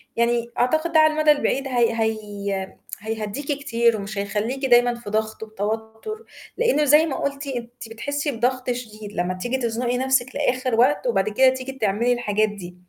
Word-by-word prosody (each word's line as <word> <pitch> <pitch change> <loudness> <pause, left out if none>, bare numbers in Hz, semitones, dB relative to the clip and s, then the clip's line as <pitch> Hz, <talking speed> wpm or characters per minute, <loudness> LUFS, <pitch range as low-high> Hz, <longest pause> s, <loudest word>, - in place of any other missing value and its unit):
يعني 235 0 +1
أعتقد 315 +7 +1
ده 315 - +6
على 310 0 +5
المدى 305 -1 +4
البعيد 275 -2 0
هي 240 -3 +2
هي 200 -3 -3 0.2
هيهدّيكِ 220 +5 -4
كتير 235 -4 +2
ومش 200 +1 -6
هيخلّيكِ 215 +7 -2
دايمًا 245 -1 +5
في 235 -3 -9
ضغط 220 +1 -2
وتوتر، 220 - -5 0.3
لإنه 465 -11 +3
زي 300 +3 +6
ما 290 - -3
قُلتِ 280 0 -3
أنتِ 240 -2 -6
بتحسّي 285 +6 -2
بضغط 250 +1 0
شديد 215 -4 -7
لمّا 180 +1 -1
تيجي 245 +8 -2
تزنقي 240 0 -1
نفْسِك 260 -1 +1
لآخر 255 -1 0
وقت، 260 +1 +3
وبعد 205 -2 +1
كده 260 +5 +5
تيجي 260 +1 -4
تعملي 235 0 +1
الحاجات 215 -3 +1
دي. 180 -4 -9
240 Hz, 170 wpm, -23 LUFS, 215-265 Hz, 0.3 s, ده